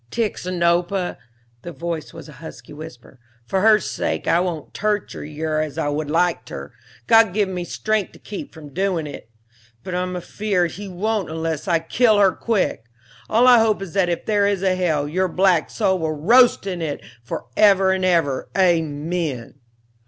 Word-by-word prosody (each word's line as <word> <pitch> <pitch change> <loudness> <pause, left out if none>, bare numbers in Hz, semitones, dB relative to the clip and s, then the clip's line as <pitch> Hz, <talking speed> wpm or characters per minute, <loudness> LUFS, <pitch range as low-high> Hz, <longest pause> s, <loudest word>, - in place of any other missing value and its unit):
"Tixinopa," 180 -4 -1 0.4
the 175 - -7
voice 170 -2 -5
was 165 -1 -11
a - - -11
husky 160 - -10
whisper, 145 -4 -11 0.3
"for 190 +7 0
her 215 0 +6
sake - - -3
I 170 - +4
won't 175 -4 -3
torture 210 -1 -2
yer 155 +1 -3
as 155 -1 -5
I 145 - 0
would 145 0 -3
like 170 +2 +1
ter, 70 +7 -8 0.3
God 225 -4 +5
give 210 -2 +2
me 180 -2 -4
strength 215 +2 -2
to - - -14
keep 205 - -8
from 150 -4 -12
doin' 185 -3 -1
it! 145 -6 -9 0.5
but 185 - -6
I'm 180 0 -2
afeared 180 -1 -1
He 205 +1 -8
won't 200 +1 -2
unless 160 0 -3
I 170 -2 +3
kill 215 +7 +2
yer 195 -2 +5
quick. 200 - -1 0.4
All 230 +3 +4
I 245 -2 +8
hope 220 -2 +2
is 195 -4 -7
that 190 -3 +2
if 170 - -3
there 205 -2 +2
is 200 -2 -1
a 190 -1 +3
hell, 160 -6 0
your 185 +5 0
black 180 -2 +2
soul 190 -4 0
will 160 -1 -1
roast 230 - +4
in 180 -3 -4
it 155 -3 -4 0.2
for 120 - -5
ever 195 -2 +5
and 190 0 0
ever, 165 -7 +1
amen!" 160 -6 0
180 Hz, 180 wpm, -21 LUFS, 160-200 Hz, 0.5 s, I